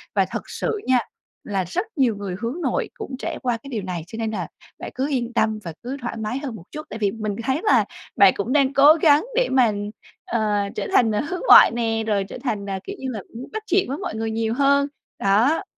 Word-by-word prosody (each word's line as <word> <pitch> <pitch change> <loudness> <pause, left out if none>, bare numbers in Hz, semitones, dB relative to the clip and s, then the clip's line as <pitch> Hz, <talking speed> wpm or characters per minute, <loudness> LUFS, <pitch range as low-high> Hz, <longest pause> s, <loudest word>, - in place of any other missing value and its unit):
Và - - +4
thật - - -4
sự 440 - -2
nha 255 -1 +4 0.4
là 195 -2 -1
rất 365 - -2
nhiều 255 -7 +2
người 200 -3 -5
hướng 245 +9 -3
nội - - -1
cũng 425 - -7
trải - - -4
qua 245 -2 0
cái 250 +5 -12
điều 225 -6 -3
này 180 -3 -4
cho 220 - -8
nên 225 -1 -2
là 180 -6 -3 0.3
bạn - - -7
cứ 265 +2 -1
yên 245 -4 -2
tâm 220 -2 +1
và 170 -3 -6
cứ 260 +3 -4
thoải 240 -1 -4
mái 220 +3 -3
hơn 270 -5 -5
một 200 - -11
chút, 305 +1 -7
tại 220 - -6
vì 205 -2 +1
mình 215 -2 -4
thấy 265 +4 0
là 430 - +4 0.3
bạn 195 -2 +7
cũng 230 +6 -2
đang 275 -2 +3
cố 285 +2 +8
gắng 295 -2 +5
để - - +3
mà, 255 -4 +4 0.5
ờ, 215 -2 0 0.2
trở 205 - -3
thành 225 -3 +4 0.2
hướng 365 - -3
ngoại - - +9
nè, 225 -1 -1
rồi 205 -2 +1
trở 195 - -8
thành, 210 -6 -2
ờ, 195 -1 -3
kiểu 395 - -6
như 265 - -4
là 220 - -4 0.2
muốn 245 +3 -8
bắt 435 0 -4
chuyện 385 -8 +2
với 275 - -2
mọi 375 - -5
người 225 0 -2
nhiều 225 0 -1
hơn. 280 +2 +3 0.3
Đó. 230 - +3
235 Hz, 245 wpm, -22 LUFS, 215-280 Hz, 0.5 s, ngoại